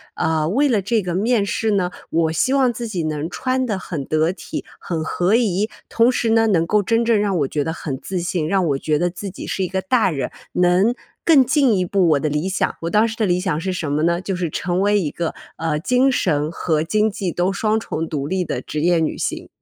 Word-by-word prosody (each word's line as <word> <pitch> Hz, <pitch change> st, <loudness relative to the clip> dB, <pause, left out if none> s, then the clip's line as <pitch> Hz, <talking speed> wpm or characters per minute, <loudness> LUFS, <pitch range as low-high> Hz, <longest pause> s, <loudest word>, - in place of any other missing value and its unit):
呃， 160 Hz, -1 st, 0 dB
为 275 Hz, -, +2 dB
了 220 Hz, -5 st, +2 dB
这 215 Hz, +3 st, +1 dB
个 180 Hz, -2 st, -3 dB
面 215 Hz, +2 st, +2 dB
试 220 Hz, +1 st, -1 dB
呢， 185 Hz, -3 st, +1 dB, 0.2 s
我 165 Hz, -1 st, +1 dB
希 165 Hz, -, +1 dB
望 265 Hz, -3 st, +3 dB
自 235 Hz, 0 st, -5 dB
己 185 Hz, -6 st, -3 dB
能 155 Hz, 0 st, -3 dB
穿 255 Hz, +10 st, -1 dB
得 215 Hz, -5 st, -1 dB
很 155 Hz, -7 st, -5 dB
得 155 Hz, +3 st, +1 dB
体， 190 Hz, -, -6 dB, 0.2 s
很 165 Hz, -3 st, -3 dB
合 180 Hz, +5 st, +1 dB
宜， 215 Hz, -3 st, +1 dB, 0.2 s
同 230 Hz, +2 st, +4 dB
时 240 Hz, -2 st, 0 dB
呢， 225 Hz, 0 st, +4 dB
能 175 Hz, -6 st, +2 dB
够 210 Hz, +4 st, +2 dB
真 230 Hz, +3 st, +2 dB
正 230 Hz, -2 st, +3 dB
让 200 Hz, -3 st, 0 dB
我 140 Hz, -, +1 dB
觉 145 Hz, +1 st, -1 dB
得 160 Hz, -, -3 dB
很 145 Hz, -5 st, -5 dB
自 185 Hz, +4 st, -4 dB
信， 175 Hz, -2 st, -1 dB
让 190 Hz, +1 st, +1 dB
我 140 Hz, -3 st, +1 dB
觉 150 Hz, +2 st, 0 dB
得 175 Hz, -, +1 dB
自 195 Hz, +3 st, -6 dB
己 185 Hz, -, -8 dB
是 190 Hz, -, -1 dB
一 -, -, 0 dB
个 190 Hz, +1 st, -2 dB
大 255 Hz, -5 st, +2 dB
人， 135 Hz, -5 st, -2 dB, 0.2 s
能 180 Hz, +6 st, +3 dB, 0.3 s
更 305 Hz, -5 st, +6 dB
进 270 Hz, -3 st, +3 dB
一 185 Hz, -, +1 dB
步 185 Hz, -1 st, +2 dB
我 150 Hz, -3 st, +3 dB
的 155 Hz, -, -1 dB
理 150 Hz, +4 st, -1 dB
想， 190 Hz, -, -1 dB
我 165 Hz, -, -2 dB
当 215 Hz, +4 st, +3 dB
时 225 Hz, -, -5 dB
的 220 Hz, -, +1 dB
理 180 Hz, -2 st, +1 dB
想 180 Hz, -5 st, -1 dB
是 190 Hz, -, -2 dB
什 165 Hz, -5 st, -3 dB
么 150 Hz, +2 st, 0 dB
呢， 170 Hz, +1 st, +2 dB
就 190 Hz, 0 st, -3 dB
是 175 Hz, -2 st, -2 dB
成 175 Hz, +3 st, -1 dB
为 205 Hz, +1 st, +3 dB
一 165 Hz, -6 st, -1 dB
个， 170 Hz, +2 st, -3 dB, 0.2 s
呃， 160 Hz, -2 st, -1 dB
精 250 Hz, -, +3 dB
神 150 Hz, -, 0 dB
和 160 Hz, -2 st, 0 dB
经 215 Hz, +6 st, +1 dB
济 195 Hz, -3 st, -3 dB
都 175 Hz, +3 st, 0 dB
双 215 Hz, +2 st, +1 dB
重 165 Hz, -7 st, -4 dB
独 145 Hz, -3 st, -3 dB
立 185 Hz, +2 st, 0 dB
的 -, -, -3 dB
职 150 Hz, -, -4 dB
业 175 Hz, +1 st, +3 dB
女 160 Hz, -, -1 dB
性。 -, -, -3 dB
185 Hz, 270 characters per minute, -20 LUFS, 160-215 Hz, 0.3 s, 更